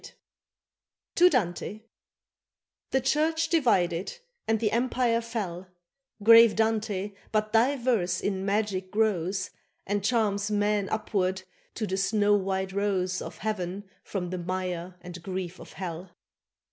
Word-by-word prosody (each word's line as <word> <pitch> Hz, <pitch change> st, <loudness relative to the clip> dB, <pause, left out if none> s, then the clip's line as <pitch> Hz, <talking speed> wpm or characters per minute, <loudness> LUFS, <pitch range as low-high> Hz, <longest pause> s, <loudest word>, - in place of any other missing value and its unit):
XX -, -, -11 dB, 1.0 s
TO 360 Hz, +1 st, +6 dB
DANTE 210 Hz, -, -1 dB, 1.1 s
THE 265 Hz, -, +1 dB
Church 315 Hz, +4 st, +1 dB
divided 195 Hz, -, +1 dB, 0.3 s
and 220 Hz, 0 st, +2 dB
the 215 Hz, -1 st, +1 dB
Empire 240 Hz, 0 st, +1 dB
fell, 195 Hz, -6 st, -5 dB, 0.6 s
Grave 230 Hz, 0 st, +8 dB
Dante, 215 Hz, -3 st, 0 dB, 0.2 s
but 215 Hz, 0 st, 0 dB
thy 250 Hz, +6 st, +4 dB
verse 235 Hz, -8 st, +1 dB
in 190 Hz, -2 st, -2 dB
magic 200 Hz, -2 st, -1 dB
grows 195 Hz, -3 st, 0 dB, 0.3 s
And 205 Hz, 0 st, -1 dB
charms 205 Hz, -3 st, +1 dB
men 205 Hz, -1 st, +1 dB
upward 190 Hz, -3 st, -1 dB, 0.3 s
to 220 Hz, -, -2 dB
the 190 Hz, -2 st, -2 dB
snow 205 Hz, +1 st, +3 dB
white 190 Hz, -1 st, -1 dB
Rose 190 Hz, -2 st, 0 dB
Of -, -, -7 dB
heaven 195 Hz, -1 st, -3 dB, 0.2 s
from 180 Hz, -3 st, -4 dB
the 185 Hz, -, -3 dB
mire 180 Hz, 0 st, -3 dB
and 175 Hz, 0 st, -9 dB
grief 185 Hz, -1 st, -5 dB
of -, -, -12 dB
hell. 180 Hz, -1 st, -6 dB
205 Hz, 130 wpm, -27 LUFS, 185-225 Hz, 1.1 s, Grave